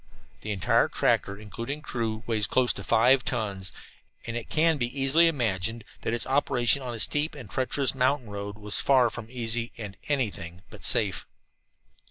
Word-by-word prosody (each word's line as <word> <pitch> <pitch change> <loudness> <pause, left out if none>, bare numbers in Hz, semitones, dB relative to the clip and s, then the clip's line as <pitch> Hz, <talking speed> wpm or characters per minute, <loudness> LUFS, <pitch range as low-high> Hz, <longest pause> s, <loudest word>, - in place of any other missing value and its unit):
The 105 - -4
entire 95 -3 +2
tractor, 100 - 0
including 115 +8 -6
crew, 115 -4 -3
weighs 110 -3 +1
close 130 -1 +2
to - - -8
five 125 +3 +4
tons, 100 -6 -3 0.5
and 115 - -5
it 120 - -5
can 160 -1 +3
be 120 - +1
easily 145 +5 +5
imagined 115 - -1 0.2
that - - -2
its 115 -2 -1
operation 130 -1 +3
on 125 -2 -5
a - - -6
steep 150 +7 +2
and 130 -7 -9
treacherous 130 +4 -1
mountain 130 -3 0
road 100 0 -6
was 105 -1 0
far 130 -4 +4
from 120 -2 -8
easy 120 -1 -1
and 105 -4 -7
anything 100 - -2
but 105 - -10
entirely 105 -1 +3
safe. - - -8
120 Hz, 175 wpm, -27 LUFS, 105-130 Hz, 0.5 s, easily